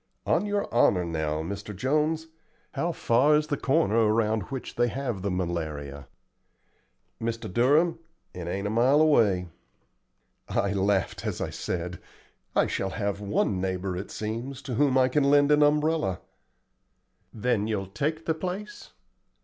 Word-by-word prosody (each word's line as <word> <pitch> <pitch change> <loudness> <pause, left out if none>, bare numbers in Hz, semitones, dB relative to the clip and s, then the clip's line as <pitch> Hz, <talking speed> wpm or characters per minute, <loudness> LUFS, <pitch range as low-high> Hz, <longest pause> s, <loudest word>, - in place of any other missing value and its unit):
"On 210 - +1
your 205 0 -1
honor 95 -6 +4
now, 80 -2 -2
Mr. 100 +4 -6
Jones, 155 - 0 0.5
how 175 - -1
far 140 +1 +3
is 150 0 +2
the 150 -1 -1
corner 140 -5 +1
around 110 0 +2
which 135 -1 -5
they 120 0 +2
have 120 -5 -3
the 100 - -1
malaria?" 80 -6 -4 1.1
"Mr. 115 -4 -3
Durham, 150 +8 +3 0.3
it 90 -2 -6
ain't 100 +3 -3
a 105 - -1
mile 125 +6 +4
away." 105 - +3 1.0
I 100 0 0
laughed 100 -1 0
as - - -3
I - - -3
said, 90 0 -4 0.6
"I - - +4
shall 95 - -2
have 100 0 -3
one 100 -2 0
neighbor, 95 0 -2
it 95 +3 -5
seems, 115 +5 -5
to 130 - -5
whom 130 +2 +3
I 130 -1 +5
can 140 +2 +1
lend 145 +1 +4
an 150 0 +5
umbrella." 150 - +2 1.1
"Then 110 -2 0
you'll 105 -3 -1
take 150 - -3
the 160 - +1
place?" 185 - -6
115 Hz, 150 wpm, -27 LUFS, 95-145 Hz, 1.1 s, I